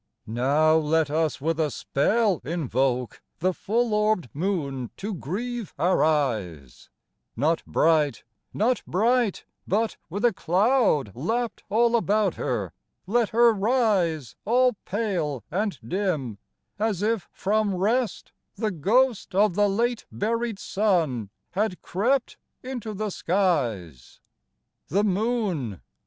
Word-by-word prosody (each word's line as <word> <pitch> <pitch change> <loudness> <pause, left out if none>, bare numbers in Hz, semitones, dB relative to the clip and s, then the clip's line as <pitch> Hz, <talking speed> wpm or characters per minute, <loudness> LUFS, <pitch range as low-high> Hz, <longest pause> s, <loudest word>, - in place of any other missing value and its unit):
Now 140 +8 +3
let 155 -1 +1
us 160 0 0
with 165 +3 -1
a 155 -2 +2
spell 200 - +1
invoke 130 -5 -1 0.2
The 185 +3 +1
full 230 +5 0
orb'd 210 - +1
moon 140 -7 -2
to 210 +2 -4
grieve 215 - -4
our 180 +2 +2
eyes; 110 - -1 0.5
Not 155 +7 +1
bright, 155 -6 +2 0.3
not 235 +2 +1
bright, 230 +2 +1 0.2
but, 220 +3 0
with 200 +7 -1
a 235 - +4
cloud 185 - +2
Lapp'd 225 - -2
all 235 +3 +3
about 215 -2 +2
her, - - -3 0.3
let 230 +3 +1
her 235 0 +5
rise 195 - +1
All 250 +3 +3
pale 180 - -2
and 200 -1 -1
dim, 155 - -2 0.4
as 210 -3 0
if 220 -2 0
from 205 0 0
rest 225 +6 0 0.2
The 220 -2 -1
ghost 210 - +1
of 205 -1 +4
the 205 +2 +3
late 235 +4 -1
buried 230 +1 -1
sun 170 - 0 0.2
Had 195 -1 -1
crept 245 +8 0 0.3
into 245 -5 -5
the 210 +1 -3
skies. 125 - -1 0.7
The 200 +7 +1
Moon! 195 - -1
195 Hz, 120 wpm, -25 LUFS, 150-220 Hz, 0.7 s, her